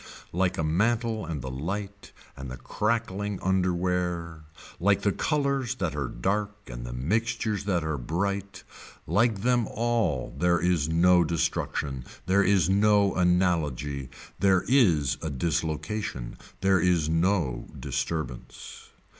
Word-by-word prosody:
Like 90 +1 +1
the 80 - -1
mantle 110 +5 0
and 75 -6 -4
the 65 - -4
light 100 +9 -5 0.2
and 65 -1 -7
the 65 - -7
crackling 105 - -1
underwear, 90 -3 0 0.3
like 100 +2 +2
the 100 - +3
colors 140 -2 0
that 90 - -2
are 70 -3 -2
dark 100 +13 -1
and - - -7
the - - -5
mixtures 110 - -1
that 90 -5 +1
are 80 -3 -2
bright, 100 +8 -3 0.4
like 110 -2 +1
them 120 -2 +2
all 115 - -1
there 85 -1 +2
is 85 -3 +1
no 90 +2 +5
destruction, 75 -4 -1 0.2
there 95 +2 +3
is 95 -4 +3
no 100 0 +4
analogy, 80 -7 +1 0.3
there 95 -2 +3
is 90 - +3
a 80 - -3
dislocation, 80 - -2 0.3
there 95 -1 +4
is 85 -3 +2
no 80 -6 +1
disturbance. 75 -7 -5
90 Hz, 130 wpm, -27 LUFS, 80-100 Hz, 0.4 s, no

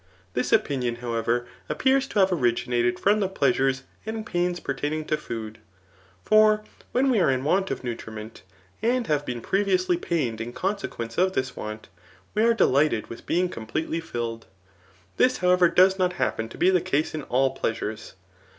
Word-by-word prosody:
This 125 - -1
opinion, 125 -4 +1
however, 120 0 -1 0.2
appears 265 +1 +2
to - - -5
have 190 -1 +4
originated 120 -4 +1
from 205 +2 +3
the 195 -2 0
pleasures 135 -5 +1 0.2
and 220 0 -5
pains 175 -3 -1
pertain 145 +1 -3
ing 155 0 -3
to 155 - +1
food; 115 -5 -6 0.7
for 215 0 +5 0.3
whai 255 - +2
we 260 -5 +3
are 175 - +3
in 130 -1 0
want 190 +6 +1
of - - -4
nutriment, 110 -2 -7 0.4
and 245 +1 +1
have 145 -4 0
been 120 -2 -3
previously 185 - +1
pained 130 -11 -2
in 120 +2 -5
consequence 125 - -3
of 185 +1 +3
this 130 -4 -2
want, 110 0 -7 0.5
we 215 - +1
are 230 +1 +4
delighted 140 - +2
with 115 - -10
being 180 +2 +2
completely 155 +6 -3
filled. 120 -7 -5 0.7
This, 255 0 +3
however, 180 -1 +4
does 190 +2 +4
not 180 -1 +2
happen 110 -9 -1
to - - -11
be 185 - +4
the 180 -2 +3
case 155 -4 0
in 155 - -3
all 135 0 +1
pleasures. 110 -3 -4
155 Hz, 170 wpm, -25 LUFS, 120-190 Hz, 0.7 s, for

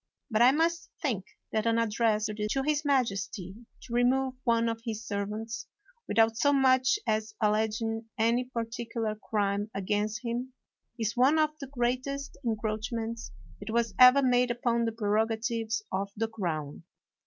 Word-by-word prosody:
But 215 +1 +2
I 245 - +8
must 330 +4 0
think 230 - -1 0.3
that 220 +1 0
an 230 0 +3
address 220 -1 +1
to 215 +5 -1
his 300 0 +1
majesty 200 - -1 0.3
to 235 - -9
remove 255 +2 +2
one 230 -1 +2
of 225 0 -2
his 225 -1 -4
servants, 210 +2 -4 0.4
without 225 0 +3
so 285 - +3
much 260 +4 +4
as 215 -1 -1
alleging 220 +1 0
any 235 +3 +2
particular 230 -2 -3
crime 205 -1 -1
against 210 +3 -1
him, 245 +2 -3 0.4
is 225 -1 -1
one 265 +5 +4
of 310 -1 +3
the 275 - -6
greatest 260 +2 -2
encroachments 225 0 -3 0.3
that 205 - -8
was 230 -2 0
ever 255 +2 +8
made 250 -1 +3
upon 235 -1 +1
the 225 - 0
prerogatives 225 +1 -1
of 195 +1 -1
the 225 +1 0
crown. 165 -10 -4
230 Hz, 145 wpm, -29 LUFS, 215-250 Hz, 0.4 s, I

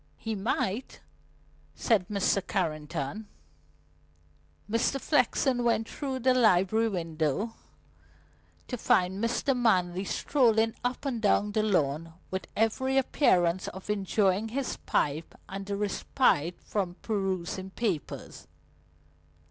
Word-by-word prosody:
"He 225 - -4
might," 210 +2 -2 0.8
said 205 -7 +2
Mr. 200 -1 +1
Carrington. 160 +2 -2 1.4
Mr. 230 +5 +1
Flexen 260 -3 +2
went 230 -1 +1
through 265 -3 -4
the 255 +1 +4
library 220 -1 +3
window 165 - -2 1.1
to 250 - -4
find 190 +2 +2
Mr. 245 +3 +1
Manley 185 -6 +2
strolling 225 -2 +2
up 245 +3 -2
and 245 -5 -2
down 210 0 +2
the 215 - +1
lawn 165 -5 0 0.2
with 190 0 -3
every 260 +5 +1
appearance 185 - +2
of 190 +3 -5
enjoying 200 0 +1
his 260 +4 -3
pipe 150 +3 0
and 195 0 -6
the 200 0 -2
respite 200 - +1
from 185 -4 -2
perusing 190 -3 -2
papers. 190 - -4
205 Hz, 110 wpm, -29 LUFS, 180-230 Hz, 1.4 s, the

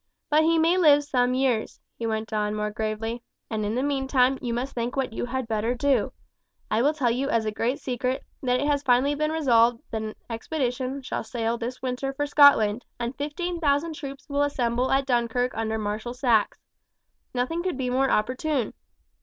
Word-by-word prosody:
"But 305 +1 +5
he 330 +1 +3
may 335 +3 +3
live 290 -4 +6
some 250 -3 +1
years," 255 -4 0 0.2
he 230 - -3
went 220 0 -3
on 210 0 0
more 210 0 -2
gravely, 220 +2 -3 0.3
"and 215 -1 -1
in 210 +2 -1
the 255 - 0
meantime 270 -2 +2
you 245 - -2
must 250 +4 -3
think 240 0 -3
what 265 -4 -1
you - - -2
had 260 0 -3
better 225 +2 0
do. 260 -3 +1 0.6
I 220 - +2
will 295 +4 +2
tell 255 -6 +1
you 265 +4 -1
as 230 -4 +1
a 215 - 0
great 235 +5 -1
secret, 255 +1 -2 0.2
that 250 -1 +1
it 285 - 0
has 290 -1 +1
been 275 - -26
finally 255 +3 +4 0.2
resolved 240 -7 +3
that 220 - -2
an 215 0 -5
expedition 255 +2 -3
shall - - -3
sail 225 +1 -2
this 240 +2 -6
winter 260 +2 -2
for 290 +2 -1
Scotland, 270 -7 +5 0.2
and 240 +2 -3
fifteen 340 +5 -3
thousand 300 +1 +1
troops 280 -3 -8
will 285 -1 0
assemble 250 -3 0
at 270 0 +2
Dunkirk 245 0 +1
under 220 0 -2
Marshal 215 +3 -3
Saxe. 240 -5 +2 0.8
Nothing 255 +8 -1
could 365 -6 -2
be 255 -2 -2
more 265 +1 +2
opportune. 255 +3 0
250 Hz, 195 wpm, -25 LUFS, 230-280 Hz, 0.8 s, live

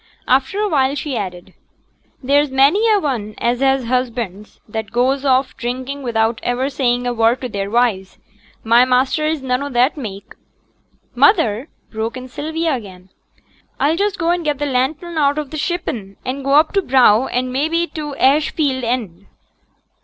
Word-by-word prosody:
After 265 +10 +1
a 425 - +1
while 275 -5 +1
she 285 -1 -4
added, 185 -3 -6 0.7
'There's 285 +2 +3
many 285 +12 +3
a 420 - +4
one 230 - -3
as 240 +1 0
has 270 -1 +2
husbands 235 -5 -3
that 220 -1 -5
goes 260 +3 +1
off 260 -1 +1
drinking 255 +3 -4
without 225 -2 0
iver 255 +3 -1
saying 245 -2 0
a 245 - 0
word 230 +2 +2
to 255 - -4
their 200 -2 -3
wives. 215 -5 0 0.5
My 235 +2 +5
master 255 +4 +1
is 310 -3 -2
none 250 0 0
o' 285 - -4
that 255 +3 +2
mak'.' 200 -7 -8 0.8
'Mother,' 270 - +3 0.2
broke 225 +2 -4
in 255 0 -8
Sylvia 320 +4 -2
again, 190 -6 -8 0.7
'I'll 300 +3 +2
just 405 +2 -1
go 335 0 +1
and 350 -1 -1
get 295 -2 -1
t' 290 - -2
lantern 290 +6 -1
out 285 0 +2
of 300 -3 -4
t' 310 - -5
shippen, 265 - -4
and 265 +2 -4
go 275 +1 0
up 310 +2 +4
t' 395 - +2
brow, 255 - +4
and 255 +1 -2
mebbe 325 +5 0
to 300 -3 -5
t' - - -14
ash 290 +3 +3
field 270 -5 -1
end.' 215 -6 -3
260 Hz, 175 wpm, -18 LUFS, 235-290 Hz, 0.8 s, My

